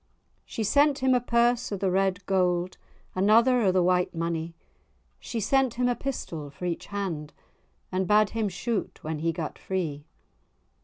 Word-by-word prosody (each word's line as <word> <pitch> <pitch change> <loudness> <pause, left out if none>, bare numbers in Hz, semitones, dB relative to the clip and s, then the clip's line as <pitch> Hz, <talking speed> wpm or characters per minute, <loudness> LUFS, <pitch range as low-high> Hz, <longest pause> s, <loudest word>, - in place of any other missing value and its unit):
She 225 - -4
sent 285 +6 +3
him 260 -2 +2
a 250 - +3
purse 235 0 +2
of 200 - -3
the 190 -1 +1
red 190 0 0
gowd, 180 -1 +1 0.4
Another 230 +6 +4
o' 195 -4 +3
the 185 -1 +2
white 180 0 +1
monie; 165 0 -3 0.6
She 235 - -4
sent 265 +3 +2
him 250 +1 +1
a 245 - +1
pistol 165 - -5
for 140 +6 -8
each 170 -2 -3
hand, 175 -7 -4 0.6
And 185 0 -1
bade 210 +1 +4
him 220 -2 -1
shoot 210 +4 -3
when 155 0 -3
he 165 +2 0
gat 160 -2 -5
free. 160 -6 -3
190 Hz, 165 wpm, -27 LUFS, 175-235 Hz, 0.6 s, Another